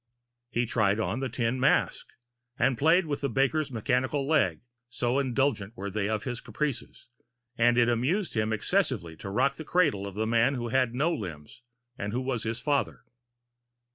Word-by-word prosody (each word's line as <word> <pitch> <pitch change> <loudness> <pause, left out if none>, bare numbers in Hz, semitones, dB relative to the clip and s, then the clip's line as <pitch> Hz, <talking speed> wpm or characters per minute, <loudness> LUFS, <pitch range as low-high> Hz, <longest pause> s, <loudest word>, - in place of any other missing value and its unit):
He 120 0 0
tried 105 -2 +1
on 110 +2 -1
the 135 -1 -2
tin 120 +1 -1
mask 135 - +2 0.5
and 125 +1 +2
played 165 +8 +4
with 145 -2 -3
the 140 - 0
baker's 135 +5 +1
mechanical 130 +4 0
leg, 120 - +2 0.3
so 120 +2 0
indulgent 125 -5 0
were 100 +1 -4
they 105 +1 -1
of 110 -1 -1
his 125 -2 -4
caprices; 140 -6 -4 0.5
and 120 +1 +3
it 120 -1 +5
amused 140 - 0
him 110 -1 0
excessively 110 - 0
to 100 - -7
rock 130 +7 +1
the 160 - -6
cradle 150 - +1
of 100 - -8
the 110 +1 -1
man 115 +4 +2
who 120 -2 -3
had 125 -1 +1
no 155 +6 +1
limbs, 85 - -7 0.4
and 100 +1 -3
who 125 - -1
was 130 -3 -2
his 115 +1 -2
father. 140 +2 -1
120 Hz, 175 wpm, -28 LUFS, 110-140 Hz, 0.5 s, it